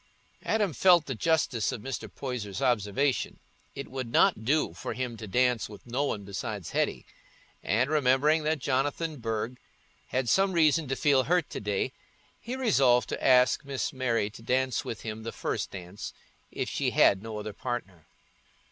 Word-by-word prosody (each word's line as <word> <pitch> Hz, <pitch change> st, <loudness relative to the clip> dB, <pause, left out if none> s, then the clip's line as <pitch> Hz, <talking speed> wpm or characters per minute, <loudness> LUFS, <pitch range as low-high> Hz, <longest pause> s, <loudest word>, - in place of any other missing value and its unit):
Adam 210 Hz, -6 st, 0 dB
felt 175 Hz, +3 st, +5 dB
the 135 Hz, -, -3 dB
justice 130 Hz, -3 st, +1 dB
of -, -, -5 dB
Mr. 135 Hz, 0 st, -5 dB
Poyser's 120 Hz, -8 st, -5 dB
observation: 125 Hz, +3 st, 0 dB, 0.4 s
it 140 Hz, -, -6 dB
would 130 Hz, -3 st, -5 dB
not 110 Hz, -, +4 dB
do 140 Hz, -, +1 dB
for 85 Hz, -, -5 dB
him 125 Hz, -2 st, -3 dB
to 110 Hz, -1 st, -8 dB
dance 125 Hz, +1 st, +1 dB
with 105 Hz, -2 st, -12 dB
no 125 Hz, +4 st, -1 dB
one 105 Hz, -7 st, -3 dB
besides 100 Hz, -1 st, -5 dB
Hetty; -, -, -1 dB, 0.6 s
and 120 Hz, +5 st, +1 dB
remembering 150 Hz, +1 st, +3 dB
that 155 Hz, +1 st, 0 dB
Jonathan 145 Hz, +4 st, -1 dB
Burge 115 Hz, +1 st, -3 dB, 0.5 s
had 130 Hz, -1 st, -1 dB
some 195 Hz, +7 st, +3 dB
reason 160 Hz, -2 st, +3 dB
to 135 Hz, -, -1 dB
feel 135 Hz, -3 st, +3 dB
hurt 175 Hz, -2 st, +1 dB
to -, -, -4 dB
day, 100 Hz, -2 st, -1 dB, 0.5 s
he 240 Hz, +3 st, -5 dB
resolved 135 Hz, -, +3 dB
to -, -, -4 dB
ask 125 Hz, -1 st, +5 dB
Miss 135 Hz, -1 st, -3 dB
Mary 115 Hz, -5 st, 0 dB
to 115 Hz, -, -12 dB
dance 130 Hz, +2 st, 0 dB
with 110 Hz, -, -6 dB
him 110 Hz, -1 st, -5 dB
the 115 Hz, +1 st, -5 dB
first -, -, -3 dB
dance, 90 Hz, +1 st, -8 dB, 0.4 s
if -, -, -3 dB
she -, -, 0 dB
had 95 Hz, -, +4 dB
no 110 Hz, 0 st, -6 dB
other 105 Hz, 0 st, -5 dB
partner. 100 Hz, -8 st, -5 dB
125 Hz, 170 wpm, -28 LUFS, 110-145 Hz, 0.6 s, felt